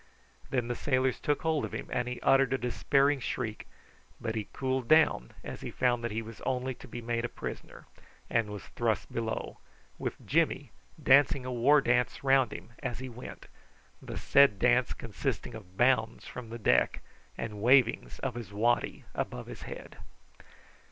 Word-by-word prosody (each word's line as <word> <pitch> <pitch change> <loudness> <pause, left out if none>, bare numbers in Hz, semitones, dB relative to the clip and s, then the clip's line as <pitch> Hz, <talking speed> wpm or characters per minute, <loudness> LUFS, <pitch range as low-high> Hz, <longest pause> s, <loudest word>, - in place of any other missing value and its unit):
Then 125 -3 0
the 120 - -1
sailors 130 0 0
took 145 -1 0
hold 160 -2 +1
of - - -4
him, - - -4
and 125 0 0
he 125 0 -4
uttered 135 -1 +4
a - - +2
despairing 140 +3 +2
shriek; 115 -3 -4 0.5
but 110 - -3
he 110 -2 -3
cooled 130 -2 -2
down 155 - +4
as - - -7
he - - -5
found 120 -2 +1
that 115 - -1
he 115 +1 -3
was 115 0 -11
only 130 0 -1
to 130 - -13
be 120 0 -7
made 115 0 -1
a 120 - -2
prisoner, - - -8 0.4
and 115 -3 +1
was 105 -1 -7
thrust 115 -2 -1
below, 115 -1 -3 0.4
with - - -5
Jimmy - - +1 0.3
dancing 140 0 +5
a 130 - -3
war 135 +5 +5
dance 125 +1 +1
round 135 -3 +4
him 115 - -9
as 120 - -3
he 130 0 -6
went, 120 +1 -9 0.6
the - - -7
said 140 -7 +5
dance - - +3
consisting - - -4
of 95 -4 -11
bounds 120 -3 +2
from 125 -3 -8
the 115 - -6
deck 110 - +2 0.3
and 105 -3 -5
wavings 125 0 +4
of 135 -2 -1
his 115 -4 -7
waddy 120 +4 +1
about - - -4
his - - -9
head. - - -9
120 Hz, 175 wpm, -30 LUFS, 115-130 Hz, 0.6 s, dancing